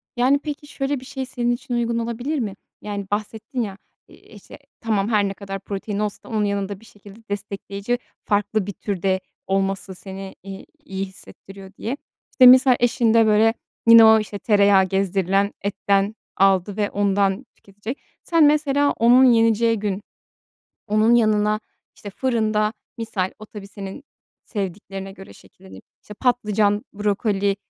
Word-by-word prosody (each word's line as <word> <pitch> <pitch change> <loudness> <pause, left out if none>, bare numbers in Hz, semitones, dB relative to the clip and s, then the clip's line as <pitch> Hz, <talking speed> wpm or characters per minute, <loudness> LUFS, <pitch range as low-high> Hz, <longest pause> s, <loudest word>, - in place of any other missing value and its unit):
Yani, 255 +3 +3
peki, 295 0 -7
şöyle 280 -1 -2
bir 255 - -13
şey 265 0 -5
senin 240 -2 -1
için 245 +1 -4
uygun 235 -1 0
olabilir 240 +6 -3
mi? 210 -5 -3 0.3
Yani, 205 -1 -5
bahsettin 220 +5 -3
ya, 200 -4 -4 0.3
i - - -19
işte, - - -15 0.2
tamam 215 -3 0
her 210 -3 +2
ne 195 - -4
kadar 195 0 -7
protein 200 +1 -5
olsa 210 -1 -4
onun 215 -2 0
yanında 200 -1 -2
bir 225 - -18
şekilde 205 0 -16
destekleyici 200 +2 -4 0.3
farklı 205 0 0
bir 205 - -4
türde 190 -1 -1 0.3
olması 195 0 -1
seni, 190 +1 -9
iii, 195 0 -9 0.2
iyi 195 -7 -4
hissettiriyor 195 0 -13
diye. 250 +5 -4 0.3
İşte, 255 - +5
misal 255 0 +8
eşin 235 -1 +2
de, 230 -1 +5
böyle, 220 +1 +4 0.3
yine 230 -1 +10
o, 220 0 +7
işte, 210 -1 -6
tereyağı 200 -2 +4
gezdirilen 195 +1 0
etten 200 +1 0 0.2
aldı 195 +1 +2
ve 205 -1 0
ondan 200 +2 +1
tüketecek. 205 +6 -8 0.2
Sen 330 -2 +3
mesela 290 -1 +3
onun 240 +3 +6
yeneceği 230 -2 +4
gün 200 -1 -2 0.9
onun 215 +3 +4
yanına, 215 -2 +2 0.4
işte, 205 - -9
fırında 215 -2 0 0.2
misal 220 -5 -2
o 215 - -10
tabii 210 -2 -10
senin 195 +6 -9 0.4
sevdiklerine 195 -1 -5
göre 195 0 -13
şekillenir. 190 +1 -16 0.2
İşte, 210 - -11
patlıcan, 210 -3 +1
brokoli, 205 -1 0
210 Hz, 150 wpm, -22 LUFS, 195-230 Hz, 0.9 s, yine